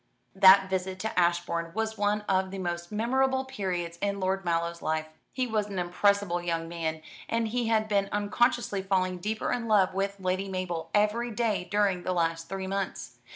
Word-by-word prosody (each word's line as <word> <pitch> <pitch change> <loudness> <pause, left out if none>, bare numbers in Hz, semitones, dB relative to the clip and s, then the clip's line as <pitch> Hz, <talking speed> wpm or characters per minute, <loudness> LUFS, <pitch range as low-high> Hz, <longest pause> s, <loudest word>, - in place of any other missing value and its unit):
That 190 0 +7
visit 190 0 -2
to 220 -4 -1
Ashbourne 170 -1 0
was 220 0 -1
one 210 0 +1
of 190 -2 0
the 195 - -6
most 175 -1 -4
memorable 265 +4 +1
periods 180 -9 -3
in 200 0 -1
Lord 190 +1 0
Mallow's 170 0 -1
life. 155 0 -1 0.3
He 255 -1 -1
was 215 -3 -1
an 200 -2 -6
impressible 180 0 +1
young 165 -1 -2
man, 160 -2 -3 0.3
and 230 -1 0
he 240 0 -1
had 220 -1 +2
been 200 -2 +1
unconsciously 205 0 +1
falling 185 -1 0
deeper 215 +4 -2
in 240 -2 -2
love 195 -4 +4
with 195 +1 -2
Lady 185 +1 -1
Mabel 185 -3 -3
every 210 +3 +2
day 215 -5 -1
during 200 -3 +2
the 185 - -1
last 165 -1 -1
three 190 0 -4
months. 195 0 -4
195 Hz, 180 wpm, -28 LUFS, 175-210 Hz, 0.3 s, That